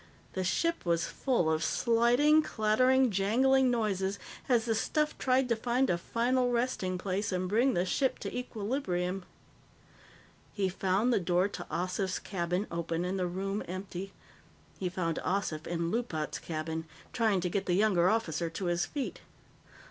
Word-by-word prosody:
The 190 - -1
ship 335 - 0
was 170 -1 +1
full 245 -11 0
of 160 +1 0
sliding, 245 +7 +4
clattering, 255 +2 +3
jangling 255 +7 +3
noises 200 -5 0 0.3
as 240 -3 +3
the 230 - +1
stuff 300 +7 0
tried 260 0 +2
to 235 - +3
find 245 +2 +1
a 175 - +1
final 245 +6 +1
resting 235 -7 0
place 195 +3 -2
and 185 0 -1
bring 235 +6 +2
the 175 - +1
ship 265 +7 +1
to - - -5
equilibrium. 200 -6 -2 1.3
He 195 -2 0
found 195 +6 +1
the - - +3
door 180 +1 +2
to 175 - -7
Ossif's 185 +2 -1
cabin 180 +1 -2
open 170 0 -2
and 190 +1 -2
the 180 - 0
room 195 +3 -3
empty. 185 +1 -6 0.7
He 185 - -1
found 170 -3 -2
Ossif 180 -5 -1
in 170 0 -1
Loopat's 175 - -2
cabin, 160 0 -4 0.3
trying 220 -5 +2
to 180 - -1
get 200 +1 -1
the 175 - +2
younger 185 -3 +4
officer 170 -7 0
to 180 +3 -5
his 175 0 0
feet. 285 -3 -4
195 Hz, 155 wpm, -30 LUFS, 180-240 Hz, 1.3 s, sliding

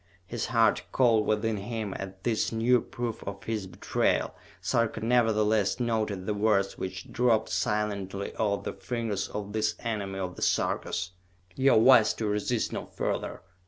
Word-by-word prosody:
His 115 +4 -3
heart 115 -3 +3
cold 115 -4 +3
within 110 0 +1
him 105 0 -4
at 95 0 -7
this 115 -3 0
new 115 +2 +3
proof 120 -3 -5
of 100 +1 -6
her 110 -3 -3
betrayal, 90 +1 0 0.3
Sarka 115 -1 0
nevertheless 110 -2 +2
noted 110 -5 -1
the 105 - 0
words 100 -2 +2
which 95 0 -6
dropped 115 -3 +2
silently 100 -2 -2
off 100 -2 0
the - - -4
fingers 115 -5 -3
of 105 -1 -6
this 110 0 0
enemy 100 -4 -3
of 90 -1 -4
the - - -8
Sarkas. 90 +1 0 0.4
"You 135 0 +4
are - - +6
wise 115 -2 +6
to 110 - -3
resist 105 +3 0
no - - -4
further! - - -3
110 Hz, 160 wpm, -28 LUFS, 100-115 Hz, 0.4 s, are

